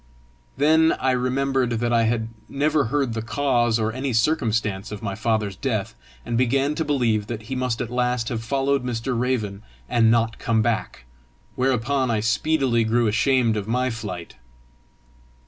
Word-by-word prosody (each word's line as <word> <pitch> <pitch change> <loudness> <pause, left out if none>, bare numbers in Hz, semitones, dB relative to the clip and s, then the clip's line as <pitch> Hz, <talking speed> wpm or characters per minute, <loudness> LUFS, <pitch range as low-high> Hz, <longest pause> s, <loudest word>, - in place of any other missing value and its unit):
Then 160 +2 +4
I 130 - 0
remembered 130 0 0
that 120 +1 0
I 115 -1 +3
had 110 0 0 0.2
never 145 +1 +1
heard 135 0 0
the 110 - -3
cause 120 0 +1
or 110 0 0
any 130 +1 -2
circumstance 110 -6 0
of 105 - -7
my 100 - -2
father's 110 -2 -1
death, 110 -2 -2 0.3
and 115 0 -1
began 135 +3 +2
to 160 - -1
believe 120 -8 0
that 115 -2 -5
he 130 +5 -5
must 125 -3 -1
at 120 - -4
last 125 -1 0
have 115 -2 -3
followed 135 +2 0
Mr. 125 +1 -2
Raven, 115 -5 -1 0.3
and 115 - +3
not 115 -1 +1
come 110 -1 +1
back; 110 - -2 0.5
whereupon 130 +1 0
I 110 -2 +1
speedily 120 +1 +1
grew 115 +2 +2
ashamed 115 +1 +2
of 105 -1 -3
my 125 +2 0
flight. 100 -7 -7
120 Hz, 165 wpm, -23 LUFS, 110-130 Hz, 0.5 s, Then